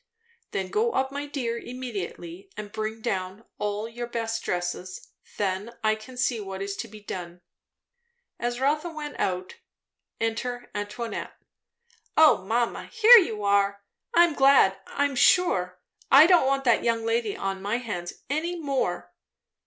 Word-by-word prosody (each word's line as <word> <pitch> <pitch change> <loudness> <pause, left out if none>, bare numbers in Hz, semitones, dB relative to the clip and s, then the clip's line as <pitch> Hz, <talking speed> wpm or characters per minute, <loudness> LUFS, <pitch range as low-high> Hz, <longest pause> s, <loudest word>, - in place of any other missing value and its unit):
"Then - - -3
go 450 +2 +1
up, 265 0 0
my 285 +1 -4
dear, 240 -5 -3
immediately; 200 -7 -7
and 210 -1 -7
bring 220 +1 -4
down 195 -1 -3
all 210 +1 -2
your 240 +1 -6
best 225 -1 -3
dresses. 180 +1 -4 0.3
Then 200 +3 -2
I 215 0 +3
can 220 +4 -10
see 245 -2 0
what 195 -2 -6
is 200 0 -4
to 230 - -5
be 215 0 -12
done." 175 -3 -7 1.0
As 240 0 -2
Rotha 300 +5 +1
went 305 -2 -7
out, 185 0 -2 0.6
enter 240 +2 -3
Antoinette. 210 +3 -5 0.8
"O 310 -11 +6
mamma, 230 +4 -1
here 455 +1 +8
you 220 - -2
are! 200 0 +2 0.3
I'm 340 -1 +6
glad, 270 -9 +5
I'm 285 -1 -1
sure. 185 - +3 0.3
I 280 +3 +9
don't 345 -6 +5
want 275 0 +1
that 235 -3 +3
young 230 -1 0
lady 225 -2 0
on 195 0 -3
my 205 +4 -1
hands 180 -8 -6
any 330 +5 -2
more." 280 -4 -2
230 Hz, 145 wpm, -26 LUFS, 200-270 Hz, 1.0 s, I